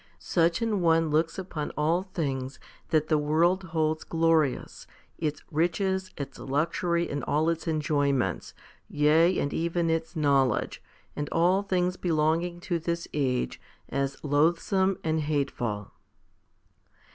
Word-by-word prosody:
2 - - -34
Such 170 +4 +1
an 215 -4 0
one 165 -2 +3
looks 160 +2 +1
upon 175 -6 -4
all 160 +4 +2
things 140 -8 -4 0.3
that 155 -1 +2
the 155 -1 +2
world 170 +6 +2
holds 160 -2 -1
glorious, 165 -4 0 0.3
its 150 -2 -2
riches, 185 +4 0
its 140 -1 -6
luxury, 170 +4 0
and 145 0 -4
all 155 +3 +1
its 165 0 -2
enjoyments 145 - 0 0.3
yea, 160 +5 +4
and 140 - -1
even 170 0 0
its 165 +1 -2
knowledge 140 -6 +1 0.3
and 145 -1 -3
all 180 +4 +3
things 180 -2 0
belonging 165 +1 0
to 175 -2 -1
this 170 +1 -3
age, 130 -4 -1 0.3
as 140 0 -2
loathsome 170 +6 +2
and 160 0 0
hateful. 135 -8 -2
160 Hz, 130 wpm, -27 LUFS, 145-170 Hz, 0.3 s, yea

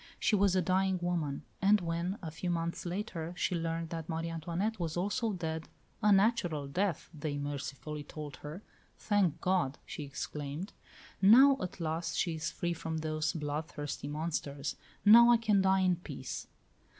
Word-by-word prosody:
She 215 - +3
was 200 -2 +3
a 185 - +3
dying 190 +2 +2
woman; 170 -5 -2 0.2
and 205 +2 +5
when, 170 +2 -2
a 160 - -4
few 175 +3 -4
months 170 0 -2
later, 175 -3 -4
she 180 - 0
learned 165 -1 -2
that 165 -1 -5
Marie 165 0 -2
Antoinette 175 +7 -2
was 165 -1 -2
also 210 +5 0
dead 160 -4 -4 0.3
"a 210 - +4
natural 195 -8 +3
death," 180 +3 -1
they 145 -2 -3
mercifully 145 +1 -5
told 145 -3 -8
her 155 +9 -8 0.3
"Thank 200 -7 +1
God!" 180 -7 +1
she - - -6
exclaimed; 145 +5 -5 0.5
"now, 260 +8 +8
at 185 0 -5
last, 165 +1 -2
she 170 - +1
is 160 -1 -2
free 175 0 -2
from 160 -1 -4
those 155 0 -1
bloodthirsty 150 -2 -4
monsters! 145 -2 -3 0.3
Now 235 +3 +9
I 240 - +7
can 215 -3 +3
die 190 0 +4
in 180 -2 +3
peace." 175 - -6
170 Hz, 160 wpm, -32 LUFS, 155-190 Hz, 0.5 s, Now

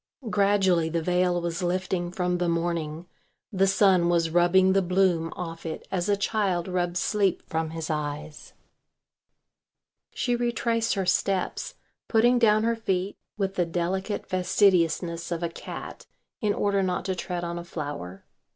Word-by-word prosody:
Gradually 195 -5 +3
the 165 0 -1
veil 180 0 +2
was 170 0 -3
lifting 180 0 -1
from 180 0 -1
the 175 -1 +1
morning, 170 -1 -2 0.5
the 195 0 +3
sun 190 -3 +4
was 165 -2 +2
rubbing 180 +2 +4
the 195 - +3
bloom 180 -3 +1
off 165 -2 -6
it 160 -1 -6
as 185 +1 -1
a 200 - +3
child 195 -4 0
rubs 180 -1 -1
sleep 200 -4 +1
from 160 0 -2
his 165 0 -5
eyes. 150 0 -5 1.6
She 245 -2 0
retraced 235 -1 0
her 195 -1 -1
steps, 195 - 0 0.3
putting 240 +2 +4
down 215 -2 +4
her 230 +1 +2
feet 195 -3 -2 0.2
with 195 -2 -1
the 180 -3 +1
delicate 185 +4 -2
fastidiousness 175 -3 +1
of 170 0 -2
a 170 - 0
cat - - -8 0.3
in 210 - +1
order 200 -1 +1
not 180 -1 -1
to 190 - 0
tread 180 -1 -4
on 170 0 -3
a - - -7
flower. 145 - -6
180 Hz, 150 wpm, -26 LUFS, 170-195 Hz, 1.6 s, sun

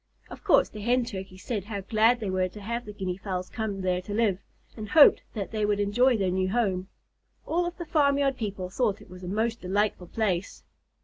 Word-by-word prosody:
Of - - -10
course - - +5
the 210 - -9
Hen 245 +3 +2
Turkeys 190 -4 -8
said 210 -6 -3
how 205 -2 -4
glad 225 +4 +3
they 205 -4 -3
were 185 0 0
to 210 - -11
have 235 +4 -4
the 210 - -7
Guinea 190 -3 -4
Fowls 185 -2 -4
come 210 -3 -3
there 180 -1 0
to 205 +3 -5
live, 210 -5 +2 0.4
and 215 -2 -7
hoped 305 +2 +7
that 200 -3 -4
they 215 -1 -1
would 205 0 +1
enjoy 235 +5 +3
their 190 -3 0
new 185 0 0
home. 190 -4 0 0.6
All 345 +2 0
of 350 - -6
the 345 - -5
farmyard 280 -4 +2
people 200 -6 -4
thought 215 -2 0
it - - -16
a 180 0 -9
most 225 +4 -1
delightful 190 -1 -1
place. 195 -4 -2
205 Hz, 210 wpm, -27 LUFS, 185-235 Hz, 0.6 s, hoped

